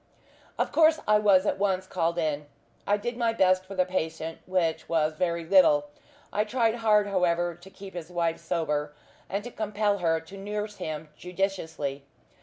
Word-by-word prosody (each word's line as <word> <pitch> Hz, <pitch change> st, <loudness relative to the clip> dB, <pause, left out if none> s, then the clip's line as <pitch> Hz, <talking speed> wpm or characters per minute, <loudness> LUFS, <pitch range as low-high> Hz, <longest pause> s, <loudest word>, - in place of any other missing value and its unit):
Of -, -, 0 dB
course 320 Hz, -1 st, +5 dB
I 210 Hz, 0 st, +5 dB
was 200 Hz, -2 st, +4 dB
at -, -, 0 dB
once 190 Hz, -2 st, +1 dB
called 170 Hz, -2 st, -1 dB
in. 150 Hz, -3 st, -1 dB, 0.4 s
I 205 Hz, -, +3 dB
did 240 Hz, +3 st, -4 dB
my 230 Hz, -2 st, +1 dB
best 185 Hz, -3 st, +3 dB
for 195 Hz, +1 st, -9 dB
the 185 Hz, -1 st, +2 dB
patient, 160 Hz, -3 st, -3 dB
which 180 Hz, -3 st, 0 dB
was 155 Hz, -2 st, +2 dB
very 170 Hz, +1 st, -1 dB
little. 155 Hz, -5 st, +5 dB, 0.4 s
I 210 Hz, -, +2 dB
tried 230 Hz, 0 st, +1 dB
hard, 215 Hz, -2 st, +4 dB
however, 175 Hz, -3 st, +1 dB
to 175 Hz, +3 st, -15 dB
keep 190 Hz, 0 st, -11 dB
his 175 Hz, -2 st, -7 dB
wife 170 Hz, -2 st, -1 dB
sober, 150 Hz, -3 st, -2 dB, 0.3 s
and 200 Hz, +1 st, -2 dB
to 245 Hz, -, -7 dB
compel 210 Hz, -2 st, 0 dB
her 165 Hz, -2 st, +2 dB
to 160 Hz, +5 st, -12 dB
nurse 210 Hz, +1 st, -4 dB
him 155 Hz, 0 st, -5 dB
judiciously. 165 Hz, -6 st, -3 dB
185 Hz, 175 wpm, -27 LUFS, 165-205 Hz, 0.4 s, course